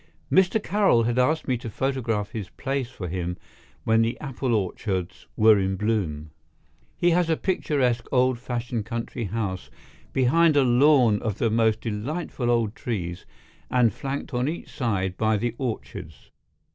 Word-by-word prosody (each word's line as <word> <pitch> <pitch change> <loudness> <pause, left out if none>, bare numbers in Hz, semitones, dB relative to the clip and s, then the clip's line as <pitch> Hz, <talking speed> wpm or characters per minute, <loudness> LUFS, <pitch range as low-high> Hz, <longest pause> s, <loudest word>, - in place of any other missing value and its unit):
Mr. 190 +3 +4
Carroll 195 - +3
had 120 +2 0
asked 155 +6 +1
me 130 -2 +1
to 115 - -6
photograph 115 -3 -1
his 105 -5 -5
place 135 -3 -3
for 100 -8 -7
him 90 0 -3 0.5
when 110 0 +3
the 115 +2 -1
apple 130 -3 -2
orchards 95 -2 -3
were 110 -1 +6
in 95 0 0
bloom. 90 -8 -2 0.7
He 175 0 +3
has 175 0 +2
a 160 - +2
picturesque 130 -10 0
old 130 -2 +2
fashioned 120 -2 -3
country 115 0 -4
house 95 -2 -3 0.4
behind 150 +5 +3
a 140 - +5
lawn 125 -4 +4
of 110 -3 -2
the 115 - +1
most 110 -1 +2
delightful 120 +4 -3
old 115 -3 +1
trees 90 -9 -4 0.4
and 120 -5 +3
flanked 140 +3 -5
on 125 +2 0
each 165 - -6
side 95 - -1
by 110 -1 +2
the 115 +2 -1
orchards. 105 - -6
115 Hz, 155 wpm, -25 LUFS, 105-130 Hz, 0.7 s, were